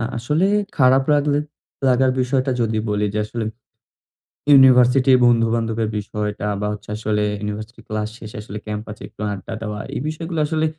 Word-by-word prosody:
আ - - -2 0.2
আসলে 150 +10 +1 0.3
খারাপ 130 +1 +5
লাগলে 145 0 +2 0.5
লাগার 130 +1 +3
বিষয়টা 130 +1 0
যদি 110 -1 0
বলি 105 0 +1
যে, - - 0
আসলে 115 +1 -4 1.1
ইউনিভার্সিটির 130 -1 +6
বন্ধু-বান্ধবের 115 -2 +1
বিষয়টা 105 0 -3
বা, 105 - -1
হচ্ছে 105 - -10
আসলে 105 -1 0 0.2
ইউনিভার্সিটি 105 +2 -6
ক্লাস 110 0 -2
শেষে 110 -2 -9
আসলে 105 0 -8
ক্যাম্পাসে 105 0 -6
একটু - - -13
আড্ডা 100 +3 -6
দেওয়া। 105 -1 -4 0.2
এই - - -2
বিষয়গুলো 165 +1 -4
আসলে 160 +1 0
115 Hz, 150 wpm, -21 LUFS, 105-130 Hz, 1.1 s, ইউনিভার্সিটির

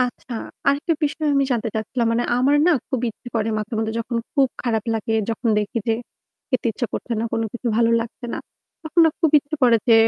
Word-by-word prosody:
আচ্ছা 250 0 -2 0.4
আরেকটা 285 +4 +2
বিষয় 300 +1 -1
আমি 275 0 +4
জানতে 235 -1 0
চাচ্ছিলাম 230 +2 -1
মানে 240 +1 +1
আমার 265 +3 +3
না - - +6 0.2
খুব 260 - -1
ইচ্ছে 230 +2 -9
করে 220 -1 +1
মাঝে-মধ্যে 220 +1 -2
যখন 235 +1 -3 0.2
খুব 275 -2 +4
খারাপ 225 -4 0
লাগে 225 0 -1 0.2
যখন 230 +1 -1
দেখি 210 +2 -1
যে 225 - +4 0.6
খেতে 255 -3 0
ইচ্ছা 240 - -2
করছে 245 - -4
না - - -1
কোনোকিছু 225 +2 -3
ভালো 230 0 +4
লাগছে 235 +2 -6
না, - - -3 0.4
তখন 315 +1 +2
না - - +6
খুব 325 -3 +3
ইচ্ছে 285 +2 -6
করে 240 -2 +6
যে 230 - +8
240 Hz, 205 wpm, -22 LUFS, 225-275 Hz, 0.6 s, যে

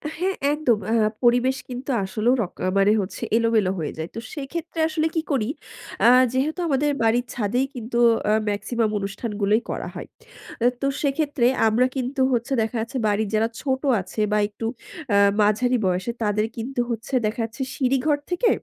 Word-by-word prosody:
হ্যাঁ, 375 +4 -1 0.2
একদম। 295 -7 +2
আ - - +2 0.3
পরিবেশ 245 +2 +3
কিন্তু 250 +2 -6
আসলেও 215 +5 +1
রক 185 - -4 0.2
মানে 195 +1 +5
হচ্ছে 190 - -6
এলোমেলো 225 -5 +2
হয়ে 155 - -3
যায়। 160 +1 -4
তো - - -3
সেক্ষেত্রে 325 +3 -5
আসলে 315 0 0
কি 320 - +2
করি, 245 -5 0 0.6
আ - - +8 0.2
যেহেতু 290 +7 0
আমাদের 290 0 +1
বাড়ির 235 +2 +2
ছাদেই 245 +3 0
কিন্তু 235 0 -4 0.3
আ - - +4 0.2
মেক্সিমাম 220 +2 -1
অনুষ্ঠানগুলোই 205 +1 -1
করা - - -3
হয়। - - -7 0.7
তো 275 - +1
সেক্ষেত্রে 285 -3 0 0.2
আমরা 225 +3 +3
কিন্তু 265 +1 -2
হচ্ছে 240 +3 -1
দেখা 225 +2 -2
যাচ্ছে 230 +4 -4
বাড়ির 205 0 0
যারা 220 +1 +2
ছোট 265 -2 -1 0.2
আছে 200 +4 -5
বা 210 - +3
একটু 210 +2 -7 0.5
আ - - +5 0.2
মাঝারি 225 +5 +2
বয়সের। 185 +6 -1
তাদের 210 0 +1
কিন্তু 245 +2 -2
হচ্ছে 235 +3 -5
দেখা 215 +3 -2
যাচ্ছে 230 +4 -9
সিঁড়ি 265 0 +1
ঘর 295 -2 +3
থেকে 360 +6 +2
235 Hz, 165 wpm, -23 LUFS, 215-270 Hz, 0.7 s, আ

